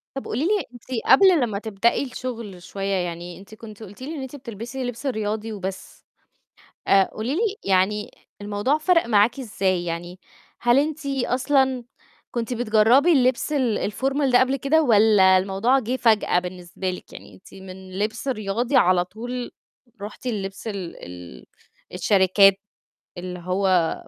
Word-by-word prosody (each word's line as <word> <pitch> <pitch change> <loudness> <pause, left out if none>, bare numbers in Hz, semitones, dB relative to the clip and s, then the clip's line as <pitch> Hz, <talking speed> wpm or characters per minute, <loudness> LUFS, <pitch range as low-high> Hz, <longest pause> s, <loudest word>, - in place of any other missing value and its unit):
طَب 270 - -5
قولي 230 - -3
لي، 410 +2 +1
أنتِ 240 - -14 0.2
قبل 375 -5 +6
لمّا 220 -5 -1
تبدئي 220 +3 0
الشغل 235 -7 -7
شوية، 195 +1 -3
يعني 175 -1 -4
أنتِ 200 +3 -14
كنتِ 215 -1 -12
قُلتِ 205 +3 -11
لي 300 +5 -5
إن 285 - -6
أنتِ 265 +2 -7
بتلبسي 240 +1 -7
لبس 245 +3 -5
رياضي 220 -2 -2
وبس، 190 -2 -7 0.8
آآ، 195 -1 +6
قولي 235 +6 -3
لي، 420 +2 0
يعني 195 +2 +1 0.3
الموضوع 205 +8 0
فَرَق 335 +2 +2
معاكِ 225 +3 +3
إزاي؟ 190 -7 -1
يعني، 175 +2 -5 0.4
هل 240 +2 +4
أنتِ 305 +1 -2
أصلًا 265 -1 +1 0.5
كنتِ 240 0 -3
بتجرَّبي 240 +6 +4
اللبس 260 0 +2
ال 245 -7 0
الformal 270 +4 0
ده 245 - +6
قبل 260 +1 +2
كده 285 +4 +2
والَّا 210 -6 +5
الموضوع 195 +8 +1
جِه 250 +1 -2
فجأة 220 -7 +3
بالنسبة 180 +1 -6
لِك؟ 180 - -8
يعني - - -12
أنتِ 190 - -18
من 190 0 -10
لبس 220 +5 -3
رياضي 235 +2 -1
على 180 0 +4
طول 240 +5 -6 0.5
رُحتِ 210 +5 -8
للبس 200 -2 -4
ال 195 -5 -5
ال 90 -8 -11 0.5
الشركات، 195 +1 +4 0.6
اللي 180 0 -6
هو 185 -1 +1
215 Hz, 150 wpm, -23 LUFS, 190-255 Hz, 0.8 s, قبل